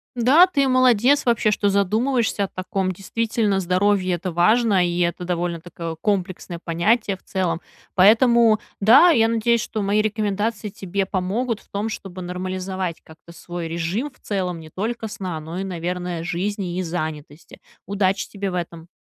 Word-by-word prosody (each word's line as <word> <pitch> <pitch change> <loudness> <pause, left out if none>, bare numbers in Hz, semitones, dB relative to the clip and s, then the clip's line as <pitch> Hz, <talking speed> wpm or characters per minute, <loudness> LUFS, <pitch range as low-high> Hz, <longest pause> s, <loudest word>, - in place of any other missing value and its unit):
Да, 265 +9 +6
ты 285 -7 +1
молодец 255 +1 +4
вообще, 230 -3 +2
что 205 -1 +1
задумываешься 215 +3 +1
о 195 - -1
таком. 185 0 -3
Действительно, 210 +1 -1
здоровье- 185 +1 +1
это 180 +1 -4
важно, 200 +2 +3
и 175 0 -2
это 175 +1 0
довольно 175 -1 -2
такое 165 -1 -7
комплексное 185 -4 -2
понятие 195 +5 +1
в - - -32
целом. 175 -3 -2 0.3
Поэтому, 225 +2 +5 0.2
да, 250 - +7
я 225 -8 +4
надеюсь, 230 0 +1
что 215 - -4
мои 200 +2 +2
рекомендации 210 0 -2
тебе 195 0 -3
помогут 210 +5 -2
в - - -26
том, 205 +2 -3
чтобы 190 -4 -7
нормализовать 185 0 -4
как-то 160 +1 -16
свой 175 -1 -6
режим 170 - -3
в - - -28
целом 180 -4 -3
не 160 -1 -11
только 220 +5 -4
сна, 185 -6 -5
но 160 +3 -7
и, - - -2
наверное, 180 -1 -4
жизни 185 0 -3
и 185 - -1
занятости. 155 -2 -6 0.3
Удачи 195 -1 0
тебе 200 -2 -4
в - - -7
этом! 170 -1 -5
195 Hz, 160 wpm, -22 LUFS, 175-220 Hz, 0.3 s, да